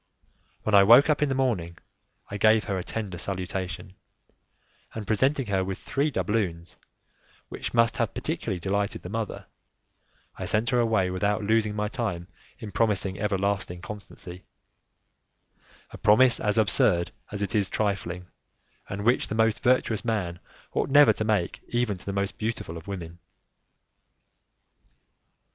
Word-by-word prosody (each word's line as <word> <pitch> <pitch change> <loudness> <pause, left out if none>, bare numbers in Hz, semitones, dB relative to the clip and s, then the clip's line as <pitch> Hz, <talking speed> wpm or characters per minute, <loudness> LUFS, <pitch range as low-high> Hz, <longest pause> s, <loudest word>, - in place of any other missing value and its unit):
When 110 - -1
I 100 - +8
woke 120 +9 +7
up 150 - 0
in 150 - +2
the 135 - 0
morning 100 -11 -1 0.5
I 100 - -3
gave 110 +2 +4
her 100 - -2
a - - -4
tender 100 -5 -5
salutation, 95 -1 -4 1.0
and 110 -2 -5
presenting 130 +7 +1
her 95 -3 0
with 95 0 -4
three 145 +3 -1
doubloons, 95 - -2 0.7
which - - -5
must 115 -1 +3
have - - -1
particularly 95 - -3
delighted 100 +3 -2
the 90 - -7
mother, 110 0 -4 0.9
I - - -3
sent 110 +4 0
her 125 - +3
away 110 -6 +2
without 100 +3 0
losing 110 0 +1
my 105 0 -1
time 105 -8 -3 0.3
in 105 - -8
promising 100 -4 0
everlasting 100 -3 -1
constancy 95 -4 -8 1.5
a - - -10
promise 120 +3 +5
as 105 0 +1
absurd 90 -3 +3 0.2
as 105 -1 -2
it 100 - -3
is 100 -3 +1
trifling, 95 -4 -2 0.6
and 100 +2 -4
which 120 +2 +3
the 110 - -4
most 110 -1 +2
virtuous 120 -3 +2
man 100 -7 -2 0.3
ought - - 0
never 145 +1 +7
to - - -3
make 105 -5 0
even 120 -4 0
to - - -14
the - - -1
most 100 0 -2
beautiful 110 -7 -3
of 80 +2 -10
women. 85 -3 -7
105 Hz, 150 wpm, -26 LUFS, 95-115 Hz, 1.5 s, I